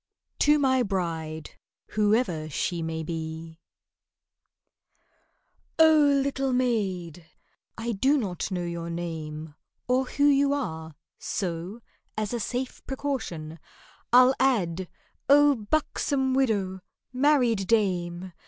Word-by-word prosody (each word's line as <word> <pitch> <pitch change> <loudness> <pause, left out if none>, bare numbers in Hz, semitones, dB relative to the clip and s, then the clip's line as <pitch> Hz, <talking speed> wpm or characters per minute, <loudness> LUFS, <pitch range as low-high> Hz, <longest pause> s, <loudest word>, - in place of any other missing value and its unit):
TO 295 0 +5
MY 260 -3 +2
BRIDE 165 -7 -3 0.4
(WHOEVER 210 -7 +1
SHE 170 +3 -2
MAY 160 0 -3
BE) 160 0 -6 2.2
OH! 320 -1 +7 0.3
little 270 -1 -1
maid!—(I 205 -2 -3
do 265 +8 +2
not 195 - -3
know 180 -2 -2
your 170 -1 -4
name 160 -2 -5 0.3
Or 255 +1 +2
who 285 +2 -2
you 280 0 +4
are, 160 - -4 0.2
so, 180 +4 -4 0.4
as 215 +1 -2
a 240 - -1
safe 250 +3 -4
precaution 200 - -4 0.5
I'll 250 +2 +7
add)—Oh, 260 - +2
buxom 265 +2 -1
widow! 205 -8 0 0.3
married 250 -7 +2
dame! 185 -4 0
205 Hz, 95 wpm, -26 LUFS, 170-260 Hz, 2.2 s, OH